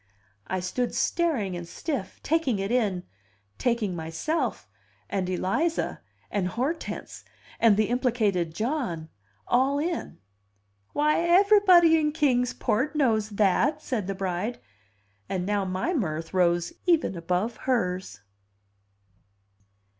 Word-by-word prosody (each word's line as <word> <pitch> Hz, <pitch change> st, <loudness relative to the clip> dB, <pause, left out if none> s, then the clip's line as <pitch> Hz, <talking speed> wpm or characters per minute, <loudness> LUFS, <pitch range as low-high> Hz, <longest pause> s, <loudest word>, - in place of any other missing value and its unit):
I 185 Hz, -1 st, -2 dB
stood 240 Hz, +7 st, -2 dB
staring 275 Hz, -, 0 dB
and 175 Hz, -1 st, -6 dB
stiff, 260 Hz, -, -4 dB
taking 310 Hz, -8 st, +1 dB
it 195 Hz, +2 st, -2 dB
in, 205 Hz, -8 st, +1 dB, 0.6 s
taking 230 Hz, -6 st, 0 dB
myself, 165 Hz, -, -2 dB, 0.4 s
and 190 Hz, -2 st, -1 dB
Eliza, 230 Hz, -, -1 dB, 0.3 s
and 195 Hz, -3 st, 0 dB
Hortense, 260 Hz, -, -4 dB, 0.4 s
and 220 Hz, -3 st, +5 dB
the 215 Hz, -, +3 dB
implicated 220 Hz, -9 st, +1 dB
John, 220 Hz, -, -2 dB, 0.4 s
all 265 Hz, +3 st, +2 dB
in. 330 Hz, +3 st, -3 dB, 0.8 s
"Why, 300 Hz, +1 st, +2 dB
aivrybody 350 Hz, -2 st, +6 dB
in 300 Hz, -1 st, 0 dB
Kings 250 Hz, -5 st, +2 dB
Port 270 Hz, +8 st, -1 dB
knows 220 Hz, -7 st, +2 dB
that!" 220 Hz, -, +2 dB
said 220 Hz, -8 st, -2 dB
the 195 Hz, -, -2 dB
bride; 190 Hz, +4 st, -2 dB, 0.7 s
and 185 Hz, -2 st, -2 dB
now 205 Hz, -1 st, 0 dB
my 185 Hz, -, -1 dB
mirth 165 Hz, -, -2 dB
rose 175 Hz, -2 st, +2 dB
even 325 Hz, -, +3 dB
above 180 Hz, +7 st, -1 dB
hers. 180 Hz, -, -1 dB
220 Hz, 115 wpm, -26 LUFS, 185-295 Hz, 0.8 s, aivrybody